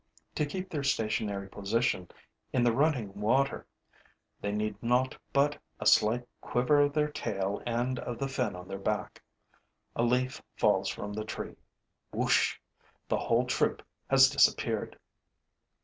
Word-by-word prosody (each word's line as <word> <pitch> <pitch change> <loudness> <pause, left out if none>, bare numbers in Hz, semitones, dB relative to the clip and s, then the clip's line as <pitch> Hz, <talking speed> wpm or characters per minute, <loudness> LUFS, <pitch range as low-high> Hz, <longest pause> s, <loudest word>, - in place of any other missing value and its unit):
To 150 - 0
keep 185 +5 -5
their 150 - -2
stationary 110 -6 -1
position 100 -2 -1 0.4
in 125 - +2
the 120 - +4
running 130 -7 +1
water, 130 +6 +1 0.7
they 100 - -1
need 105 0 -2
naught 125 +2 +2 0.2
but 145 +1 +2 0.2
a - - -5
slight 120 +3 +4
quiver 125 +4 +2
of 145 0 +2
their 150 0 +2
tail 100 -6 -2
and 120 +2 0
of 120 - -5
the 135 - -2
fin 125 -7 -1
on 90 0 -9
their 95 - -5
back. 105 +1 -2 0.7
A - - 0
leaf 125 +2 +1
falls - - +2
from 105 0 -5
the 110 +1 -3
tree. 110 - -6 0.6
Whoosh! - - +2 0.5
The - - +1
whole 120 +2 +2
troop 125 - 0 0.3
has 135 -1 +8
disappeared. 140 - +2
120 Hz, 145 wpm, -30 LUFS, 105-135 Hz, 0.7 s, has